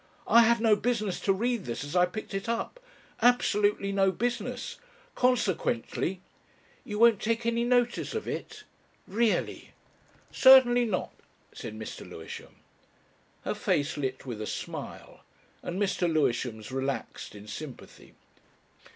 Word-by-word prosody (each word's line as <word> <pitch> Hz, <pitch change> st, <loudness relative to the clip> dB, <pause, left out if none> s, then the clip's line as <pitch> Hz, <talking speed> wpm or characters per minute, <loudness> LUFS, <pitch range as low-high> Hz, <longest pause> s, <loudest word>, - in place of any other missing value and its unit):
"I 235 Hz, -, +7 dB
had 235 Hz, 0 st, +4 dB
no 220 Hz, -2 st, +5 dB
business 215 Hz, -3 st, -1 dB
to 195 Hz, -, +1 dB
read 230 Hz, +1 st, 0 dB
this 120 Hz, -, -4 dB
as 145 Hz, +4 st, -6 dB
I 180 Hz, 0 st, +5 dB
picked 215 Hz, +3 st, -7 dB
it 195 Hz, +3 st, -3 dB
up 235 Hz, -, -2 dB, 0.4 s
absolutely 210 Hz, -4 st, +3 dB
no 195 Hz, -1 st, +3 dB
business. 240 Hz, +6 st, -3 dB, 0.3 s
Consequently...." 190 Hz, -, 0 dB, 0.6 s
"You 210 Hz, -, -5 dB
won't 230 Hz, -2 st, +5 dB
take 230 Hz, +1 st, -1 dB
any 235 Hz, 0 st, +1 dB
notice 245 Hz, -, +1 dB
of 445 Hz, -, -3 dB
it? 435 Hz, -1 st, -5 dB, 0.4 s
Really!" 225 Hz, +2 st, 0 dB, 0.6 s
"Certainly 250 Hz, -2 st, +7 dB
not," 205 Hz, -5 st, -2 dB, 0.4 s
said 110 Hz, -, -7 dB
Mr. 110 Hz, -, -7 dB
Lewisham. 80 Hz, -, -9 dB, 0.9 s
Her -, -, 0 dB
face 145 Hz, +1 st, 0 dB
lit 130 Hz, -2 st, -3 dB
with 115 Hz, -5 st, -5 dB
a 105 Hz, -, -4 dB
smile, -, -, -7 dB, 0.4 s
and 175 Hz, +2 st, -4 dB
Mr. 185 Hz, -4 st, +1 dB
Lewisham's 120 Hz, -7 st, 0 dB
relaxed 135 Hz, -4 st, -4 dB
in 105 Hz, 0 st, -11 dB
sympathy. 135 Hz, +4 st, -9 dB
205 Hz, 130 wpm, -28 LUFS, 150-235 Hz, 0.9 s, I